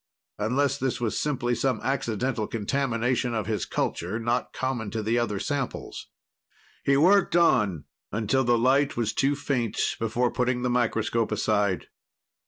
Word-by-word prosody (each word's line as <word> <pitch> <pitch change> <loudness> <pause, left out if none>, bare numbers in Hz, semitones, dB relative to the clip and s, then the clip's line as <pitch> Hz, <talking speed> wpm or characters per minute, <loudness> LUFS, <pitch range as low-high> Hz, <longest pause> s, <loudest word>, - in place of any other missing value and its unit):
Unless 130 +6 +1
this 130 -1 -1
was 115 -3 -1
simply 125 -5 0
some 130 +1 0
accidental 125 -3 -1
contamination 120 +1 -1
of 110 -3 -1
his 110 0 -2
culture, 95 +7 -2
not 120 +2 -1
common 125 -5 -3
to 110 +1 -3
the 115 +3 +1
other 105 -4 -1
samples. 140 0 -4 0.8
He 140 0 +3
worked 185 +4 +4
on 105 - +3 0.3
until 115 +5 +1
the 120 -1 +3
light 135 +4 +2
was 115 -2 0
too 140 +1 +2
faint 130 -6 -2 0.2
before 120 +2 0
putting 125 0 0
the 125 - +1
microscope 115 -2 0
aside. 105 -3 +1
120 Hz, 145 wpm, -26 LUFS, 110-135 Hz, 0.8 s, worked